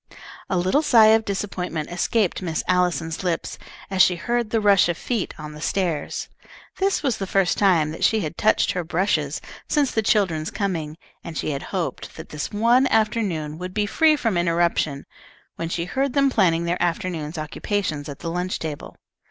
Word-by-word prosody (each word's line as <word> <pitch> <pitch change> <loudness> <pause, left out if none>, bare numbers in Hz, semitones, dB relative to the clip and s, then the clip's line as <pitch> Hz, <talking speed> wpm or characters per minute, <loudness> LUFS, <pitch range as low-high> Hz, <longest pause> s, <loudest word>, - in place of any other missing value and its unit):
A 190 - +1
little 185 +12 +2
sigh 230 -8 +6
of 220 0 +2
disappointment 185 -6 -3
escaped 190 +3 0
Miss 165 -4 -2
Allison's 175 -2 0
lips, 175 -3 -2 0.3
as 190 -1 +3
she 180 0 +5
heard 235 +5 -1
the 225 - +1
rush 200 -4 +4
of 170 - -1
feet 230 -6 -2
on 150 0 -7
the 150 - -10
stairs. 170 -4 -2 0.5
This 390 -2 +1
was 260 -6 +1
the 195 - -4
first 195 -1 +1
time 170 -6 +3
that 160 - -6
she 220 -1 +3
had 155 -2 -4
touched 215 - +2
her 180 - -2
brushes 165 -4 0 0.3
since 290 -3 +1
the 220 - +1
children's 185 -8 +1
coming, 165 -7 -3 0.3
and 165 -3 -7
she - - -2
had 140 -1 -3
hoped 180 -4 -4
that 160 - -9
this 150 -1 -5
one 235 +5 +3
afternoon 195 -9 0
would 185 +1 -6
be 210 -1 +1
free 310 +8 +4
from 225 -10 0
interruption, 170 -4 +1 0.5
when 165 - -3
she 170 0 -2
heard 270 +7 -1
them 275 -1 +3
planning 170 -7 +2
their 170 +1 -1
afternoon's 170 -2 -2
occupations 155 -1 -3
at 140 - -7
the 165 - -3
lunch 180 +2 -2
table. 155 -3 -6
180 Hz, 185 wpm, -23 LUFS, 165-210 Hz, 0.5 s, sigh